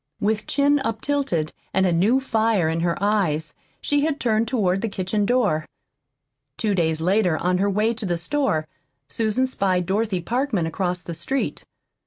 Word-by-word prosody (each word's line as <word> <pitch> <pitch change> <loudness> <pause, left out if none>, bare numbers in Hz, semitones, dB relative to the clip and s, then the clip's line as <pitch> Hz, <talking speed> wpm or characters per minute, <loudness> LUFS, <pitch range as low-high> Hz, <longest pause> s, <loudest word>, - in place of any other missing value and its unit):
With 215 +1 0
chin 285 +1 +3
up 225 -5 -2
tilted 245 - -1 0.2
and 190 0 +4
a 180 - +2
new 205 +10 +3
fire 220 -8 +1
in 160 +1 0
her 170 0 0
eyes, 195 -7 0 0.3
she 290 0 +1
had 305 -1 0
turned 225 -1 +1
toward 195 -6 +1
the 225 - -1
kitchen 200 +2 -1
door. 215 -11 +2 0.9
Two 215 -2 0
days 160 -3 0
later, 180 -1 +2
on 180 +1 0
her 200 +1 +2
way 215 +3 +1
to 220 -3 -4
the 175 -1 0
store, 170 - 0 0.4
Susan 220 - 0
spied 190 -8 0
Dorothy 200 0 0
Parkman 235 - -1
across 180 +1 -2
the 170 - -6
street. 170 +12 -3
205 Hz, 170 wpm, -23 LUFS, 175-230 Hz, 0.9 s, and